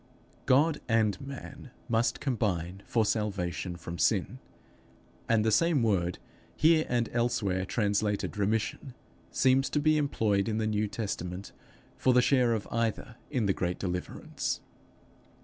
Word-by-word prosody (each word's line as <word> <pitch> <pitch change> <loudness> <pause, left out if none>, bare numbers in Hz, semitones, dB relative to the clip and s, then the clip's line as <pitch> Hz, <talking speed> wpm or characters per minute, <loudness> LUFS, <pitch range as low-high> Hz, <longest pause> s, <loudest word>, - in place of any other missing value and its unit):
God 145 +4 +3
and 110 -4 +2
man 140 0 -9 0.2
must 115 0 +1
combine 95 - -1
for 115 -2 +2
salvation 95 -5 -2
from 85 0 -7
sin, - - +1 0.9
and 110 -2 +3
the 110 - +3
same 165 +2 +3
word, 90 -5 +1 0.4
here 160 0 +4
and 120 -2 +1
elsewhere 100 -6 0
translated 105 -1 0
remission, 110 +5 -1 0.3
seems 130 +1 +3
to 150 - 0
be 155 +1 +3
employed 110 -8 +1
in 110 - -1
the 110 - 0
New 105 0 0
Testament 100 -3 -5 0.5
for 130 - +3
the - - +7
share 125 -4 +3
of 110 -3 -3
either 115 +2 -2
in 125 -7 0
the 100 - +2
great 90 -1 -2
deliverance. 90 -1 -3
110 Hz, 135 wpm, -29 LUFS, 100-130 Hz, 0.9 s, the